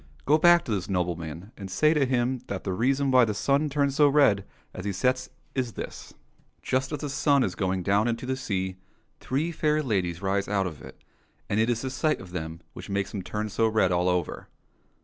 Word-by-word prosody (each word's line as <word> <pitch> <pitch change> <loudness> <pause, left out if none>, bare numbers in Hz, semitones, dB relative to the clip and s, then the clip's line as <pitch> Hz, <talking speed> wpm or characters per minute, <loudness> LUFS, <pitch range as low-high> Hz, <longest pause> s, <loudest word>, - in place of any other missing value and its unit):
Go 150 +3 +4
back 175 +1 +6
to - - -4
this 95 -3 -2
noble 90 -2 0
man 85 +5 -8
and 95 -2 -8
say 155 +11 +3
to 145 -4 +2
him 125 0 0
that 100 -2 -4
the 95 - -2
reason 135 +6 +1
why 130 -1 +6
the 110 -3 0
sun 140 +6 +1
turns 140 -1 0
so 145 -1 +6
red 135 -9 +4 0.3
as 90 - -7
he 100 - -1
sets 125 +6 0 0.2
is 125 -4 -2
this: - - -8 0.5
Just 130 +2 0
as 150 - -3
the 150 - -3
sun 140 -1 +3
is 95 - -1
going 95 -2 -1
down 100 +4 +2
into 115 +1 -2
the 130 +1 -1
sea, 95 -7 -3 0.4
three 150 +6 -1
fair 155 -1 +1
ladies 90 - -1
rise 100 +1 0
out 100 -2 +1
of 80 -6 -6
it, - - -12 0.5
and 100 - 0
it 110 +2 +2
is 115 -1 0
the 130 - -3
sight 155 +4 0
of 95 -2 -11
them 80 -2 -5
which - - -9
makes 100 0 -2
him 100 - -3
turn 105 +4 -3
so 115 +2 +2
red 110 -4 +2
all 90 +1 +2
over 90 -1 -2
110 Hz, 225 wpm, -27 LUFS, 95-135 Hz, 0.5 s, back